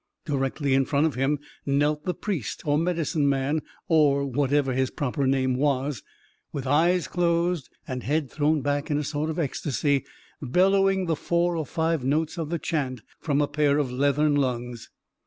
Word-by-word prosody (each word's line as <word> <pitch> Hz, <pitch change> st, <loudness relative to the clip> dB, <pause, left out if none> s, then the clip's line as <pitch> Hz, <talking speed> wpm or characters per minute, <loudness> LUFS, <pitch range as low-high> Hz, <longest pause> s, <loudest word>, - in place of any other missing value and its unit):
Directly 140 Hz, -1 st, -1 dB
in 135 Hz, 0 st, +3 dB
front 145 Hz, +2 st, +2 dB
of 160 Hz, -, 0 dB
him 135 Hz, +4 st, +1 dB, 0.3 s
knelt 145 Hz, +2 st, +1 dB
the 180 Hz, -, -1 dB
priest, 180 Hz, -, -4 dB
or 145 Hz, -1 st, +2 dB
medicine 165 Hz, -3 st, 0 dB
man, 140 Hz, +3 st, 0 dB, 0.3 s
or 145 Hz, -5 st, +3 dB
whatever 140 Hz, 0 st, +1 dB
his 130 Hz, 0 st, +1 dB
proper 140 Hz, 0 st, -1 dB
name 130 Hz, -1 st, +2 dB
was, 135 Hz, -1 st, 0 dB, 0.5 s
with 140 Hz, -2 st, -5 dB
eyes 165 Hz, +5 st, +3 dB
closed, 170 Hz, -3 st, 0 dB, 0.2 s
and 130 Hz, -1 st, -4 dB
head 150 Hz, +2 st, 0 dB
thrown 150 Hz, 0 st, +1 dB
back 145 Hz, +2 st, -1 dB
in 145 Hz, -, +1 dB
a 150 Hz, -, -1 dB
sort 150 Hz, +2 st, -2 dB
of 160 Hz, -, -3 dB
ecstasy, 145 Hz, -2 st, 0 dB, 0.4 s
bellowing 190 Hz, +6 st, +3 dB
the 165 Hz, -2 st, 0 dB
four 170 Hz, +2 st, 0 dB
or 160 Hz, -3 st, -3 dB
five 160 Hz, -3 st, 0 dB
notes 155 Hz, +5 st, 0 dB
of 160 Hz, -2 st, -3 dB
the 170 Hz, -, -1 dB
chant 135 Hz, -8 st, -3 dB, 0.2 s
from 145 Hz, -2 st, 0 dB
a 145 Hz, -, +2 dB
pair 145 Hz, -1 st, +2 dB
of 140 Hz, -4 st, 0 dB
leathern 145 Hz, +3 st, +2 dB
lungs. 125 Hz, -4 st, -2 dB
145 Hz, 175 wpm, -25 LUFS, 135-160 Hz, 0.5 s, in